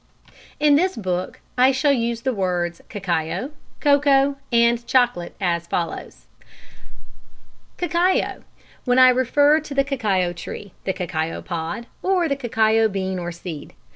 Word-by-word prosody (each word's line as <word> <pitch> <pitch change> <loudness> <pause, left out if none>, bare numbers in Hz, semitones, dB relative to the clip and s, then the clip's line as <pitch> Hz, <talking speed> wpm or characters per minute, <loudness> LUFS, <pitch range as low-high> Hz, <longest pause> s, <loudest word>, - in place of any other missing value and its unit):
] - - -24
In 295 -1 +5
this 370 +4 +1
book 185 -3 -3 0.2
I 255 +2 +6
shall 280 +2 +2
use 235 -3 -1
the 260 +1 -1
words 180 -4 -2
cacao, 190 - -2 0.3
cocoa, 280 -1 +3
and 235 0 +3
chocolate 245 -9 +1
as 170 -3 -1
follows: 170 0 -4 1.5
Cacao, 355 +1 0 0.4
when 245 -1 +1
I 255 0 +8
refer 285 +4 +3
to 295 -2 -8
the 275 - +3
cacao 205 -10 0
tree, 180 +3 -8
the 190 - 0
cacao 165 -3 -3
pod, 170 +6 -4 0.2
or 370 -3 +1
the 280 - 0
cacao 225 -3 +2
bean 190 -2 -3
or 175 0 -4
seed. 170 -3 -8
235 Hz, 140 wpm, -22 LUFS, 180-275 Hz, 1.5 s, I